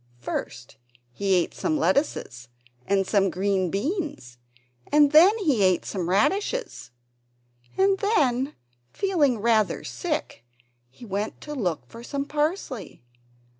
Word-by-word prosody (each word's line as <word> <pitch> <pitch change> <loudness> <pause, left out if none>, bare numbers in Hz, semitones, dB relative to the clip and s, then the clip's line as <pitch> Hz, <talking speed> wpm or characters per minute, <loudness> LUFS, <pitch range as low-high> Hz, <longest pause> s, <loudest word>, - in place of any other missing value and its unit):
First 120 0 -6 0.3
he 195 +8 0
ate 175 -2 0
some 155 - -1
lettuces 165 - -1 0.4
and 195 -1 +2
some 195 -1 +2
French 190 +1 0
beans, 230 - -4 0.5
and 290 -1 +5
then 355 +8 +7
he 295 - +1
ate 185 -2 +3
some 180 -4 -3
radishes; 400 - 0 0.9
and 390 0 +3
then, 280 - +1 0.4
feeling 320 - +1
rather 220 -1 +1
sick, 305 - -4 0.5
he 185 - -14
went 205 +1 -3
to 300 - -7
look 180 - -2
for 230 - -12
some 280 +2 -3
parsley. 295 - -3
235 Hz, 120 wpm, -25 LUFS, 185-305 Hz, 0.9 s, then